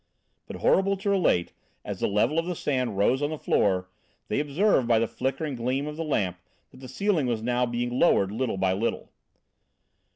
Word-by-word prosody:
But - - -7
horrible 195 +1 +2
to 200 +1 -1
relate, 175 - +1 0.3
as - - -5
the - - +1
level 105 +10 +1
of 165 - -3
the 180 - -2
sand 130 -9 -1
rose 125 +7 +2
on 145 - 0
the 155 - -4
floor, 95 -9 +1 0.4
they - - 0
observed 150 - +2
by 115 -1 +4
the 115 - +2
flickering 135 +5 -3
gleam 130 +3 -1
of 150 0 -5
the 165 - -3
lamp, 95 - -1 0.3
that 130 - -16
the 130 - -9
ceiling 165 0 0
was 115 -2 -2
now 125 +1 +1
being 120 +1 -2
lowered 100 - +3
little 115 -1 -2
by 95 0 +1
little. 105 +5 -3
130 Hz, 195 wpm, -26 LUFS, 110-155 Hz, 0.4 s, by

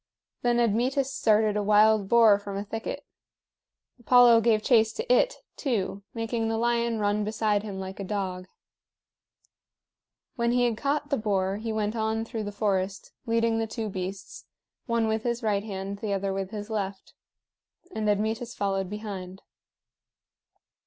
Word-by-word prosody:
Then 240 0 +2
Admetus 255 +4 +1
started 215 -1 +2
a 210 - +1
wild 210 0 +4
boar 225 -4 +6
from 200 -1 -6
a 200 - -3
thicket. 225 +2 -5 0.9
Apollo 240 -1 +6
gave 215 -2 +2
chase 220 -3 +4
to 245 - 0
it, - - +3 0.2
too, 205 -7 -2
making 225 0 -2
the 225 0 -1
lion 235 0 +1
run 205 0 0
beside 210 -1 0
him 200 -2 -6
like 190 +1 -7
a - - -3
dog. 185 -2 -3 1.9
When 235 0 +1
he 245 0 +3
had 235 -2 +1
caught 290 +4 -2
the 280 - +2
boar, 195 -3 0
he 225 +1 -4
went 215 0 -1
on 220 0 -1
through 225 -2 -5
the 205 - -4
forest, 195 -2 -2 0.2
leading 230 0 +1
the 225 - -1
two 220 -1 -4
beasts, 190 0 -6 0.4
one 230 -2 +1
with 220 0 0
his 235 +1 -2
right 205 -2 +1
hand, 200 -1 -5
the 205 -2 -2
other 195 0 -1
with 195 -1 -3
his 210 0 -7
left; 195 -2 -4 0.8
and 215 -9 -1
Admetus 220 +4 -1
followed 195 -2 -1
behind. 195 -3 -7
215 Hz, 155 wpm, -27 LUFS, 200-230 Hz, 1.9 s, boar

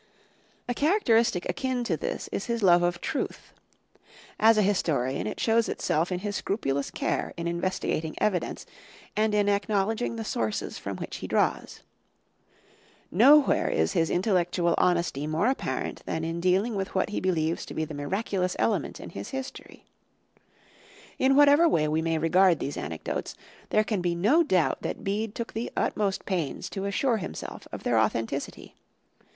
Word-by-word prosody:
A 245 - 0
characteristic 235 - +2
akin 260 -2 -1
to 190 -8 0
this - - -4
is 200 - -3
his 235 -2 -1
love 175 -2 +6
of 175 0 0
truth. - - -4 0.9
As 225 0 +6
a 210 - +4
historian, 145 -9 0
it - - -5
shows 230 0 +2
itself 165 +4 0
in 180 0 -2
his 205 0 -3
scrupulous 140 -12 -1
care - - -2
in 170 - -4
investigating 170 -2 -2
evidence 190 -5 -1 0.5
and 215 0 +2
in 205 -1 +2
acknowledging 205 +3 0
the 225 -1 -5
sources 110 - -2
from - - -5
which - - -6
he - - -6
draws. - - 0 1.3
Nowhere 275 - +5
is 80 +1 +1
his 165 -1 +1
intellectual 175 -2 +1
honesty 170 -5 +1
more 155 +6 0
apparent 270 - -3
than 160 - -2
in 165 +1 -3
dealing 185 +6 +2
with 195 -1 -4
what 190 - +1
he 210 - -2
believes 165 -3 0
to - - -8
be 160 - -1
the 155 - -8
miraculous 185 +5 -2
element 230 - 0
in - - -9
his - - -7
history. 265 -1 -8 1.3
In 270 +1 +4
whatever 290 +4 +6
way 155 - +2
we 155 +1 0
may 165 0 0
regard 175 +2 +4
these 140 - -4
anecdotes, 80 +1 -4 0.3
there 215 - +3
can 210 -3 -2
be 175 -1 0
no 220 - +4
doubt 185 - +1
that - - -4
Bede 210 +2 -2
took 235 - -5
the 225 +2 -4
utmost 200 -2 0
pains 175 -8 -3
to 195 -1 -4
assure 225 +4 +1
himself 120 - -7
of - - -7
their - - +2
authenticity. 115 +5 -2
190 Hz, 160 wpm, -27 LUFS, 165-225 Hz, 1.3 s, love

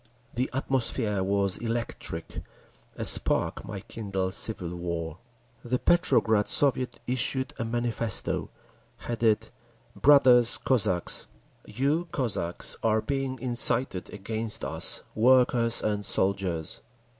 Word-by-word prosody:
The 125 +2 -2
atmosphere 125 -6 -1
was 100 -1 -1
electric; 115 -8 -5 0.5
a - - -4
spark - - +3
might - - -9
kindle 95 -4 -4
civil 95 -6 +1
war. 85 -1 -5 0.4
The 125 +1 -1
Petrograd 110 -11 +2
Soviet 130 -3 +4
issued 130 +1 0
a 115 - -2
manifesto, 115 -2 -2 0.5
headed 110 -2 -1 0.4
"Brothers—Cossacks!" 125 -7 +3 0.4
You, 145 +9 -1
Cossacks, 95 - -2
are 110 -1 +1
being 135 -2 -3
incited 120 -4 +2
against 110 +2 -2
us, - - +1
workers 120 0 +2
and 105 -1 -2
soldiers. 95 -5 -2
115 Hz, 100 wpm, -26 LUFS, 100-125 Hz, 0.5 s, Soviet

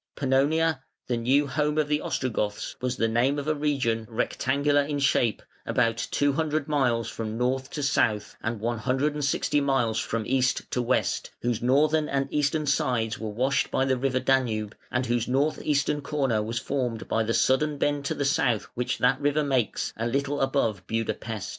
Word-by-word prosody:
Pannonia, 145 +3 +2 0.2
the 125 - -1
new 130 +5 +2
home 150 +1 -1
of 155 -1 +2
the 150 0 0
Ostrogoths, 105 -5 -2
was 125 0 -2
the 115 - +2
name 120 +5 +1
of 145 0 -4
a 155 - +2
region, 135 -7 -1
rectangular 140 +5 +1
in 145 0 -2
shape, 135 -6 +1 0.2
about 115 -1 0
two 145 0 +1
hundred 155 -1 -1
miles 125 -7 +1
from 110 -1 -5
north 130 +2 -1
to 150 - -4
south 110 -6 +1
and 115 -1 -3
one 115 +1 -2
hundred 135 +7 0
and 150 0 -3
sixty 145 +1 +1
miles 125 -5 +1
from 115 -1 -2
east 130 +1 +1
to 125 - 0
west, 120 +2 0
whose 120 -2 0
northern 150 +5 +3
and 140 0 0
eastern 150 +1 +1
sides 120 -5 0
were 110 - -4
washed 130 +6 0
by 135 - +1
the 130 -1 +2
river 130 0 0
Danube, 115 -6 0
and 125 +1 -1
whose 120 -1 0
north 140 +4 +1
eastern 145 0 0
corner 135 -6 0
was 115 +3 -3
formed 125 -3 -2
by 115 - +1
the 115 +1 0
sudden 145 +3 +2
bend 145 0 0
to - - -1
the 140 - -1
south 120 -5 +2
which 125 -1 -2
that 125 - +2
river 145 +1 +2
makes, 130 -6 0
a 115 +1 -2
little 140 +3 -1
above 135 -7 +1
Buda 115 0 -1
Pest. 110 -4 -6
130 Hz, 190 wpm, -26 LUFS, 115-145 Hz, 0.2 s, northern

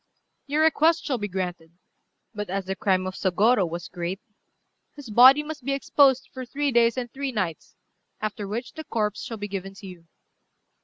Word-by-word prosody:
"Your 300 +3 +2
request 320 +1 +3
shall 260 -5 -1
be 205 - -2
granted; 180 -4 -5 0.6
but 210 -3 -5
as 195 0 -2
the 190 +1 -3
crime 185 -2 +1
of 185 - -4
Sôgorô 195 +1 +2
was 170 0 -6
great, 175 +2 -4 0.8
his 275 -6 -10
body 260 +6 +8
must 300 -3 -7
be 275 +2 -1
exposed 275 -1 +3
for 260 - -6
three 285 +3 -2
days 235 0 +3
and 245 -2 -4
three 275 0 -3
nights, 185 -9 -4 0.4
after 210 -1 -4
which 230 +5 -5
the 315 - -7
corpse 210 -6 -2
shall 225 - -6
be 205 0 -5
given 195 -1 -6
to 195 - -12
you." 175 -3 -11
215 Hz, 185 wpm, -25 LUFS, 190-265 Hz, 0.8 s, body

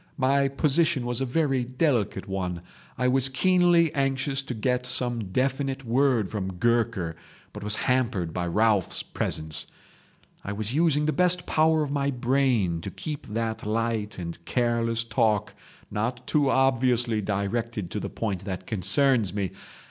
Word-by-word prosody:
My 140 0 +3
position 145 0 +1
was 120 +1 +2
a 135 - 0
very 135 -2 +1
delicate 120 - 0
one. 90 -3 -3 0.3
I 125 - +1
was 130 +1 +2
keenly 175 +2 +3
anxious 135 0 0
to 130 -2 -6
get 125 +3 -1
some 120 -3 +1
definite 135 +5 -1
word 120 -3 +2
from 95 -3 -3
Gurker, 110 -4 0 0.4
but - - -8
was 105 +1 +1
hampered 115 -11 0
by 90 -1 -2
Ralphs' 105 +1 +2
presence. 80 -1 -2 0.8
I 100 - -4
was 110 +3 -2
using 150 -1 +2
the 155 - +1
best 180 0 +2
power 160 0 +3
of 145 - -4
my 140 -1 0
brain 125 -9 +1
to - - -5
keep 150 -2 -6
that 110 +1 -3
light 110 -1 -1
and 85 -1 -6
careless 115 -1 0
talk 110 -2 0 0.4
not 120 +3 -2
too 145 -3 +2
obviously 125 -4 +2
directed 105 0 -2
to - - -2
the - - -4
point 100 -5 -3
that 95 -2 -5
concerns 105 +1 +1
me. 100 -4 -1
120 Hz, 150 wpm, -26 LUFS, 105-135 Hz, 0.8 s, My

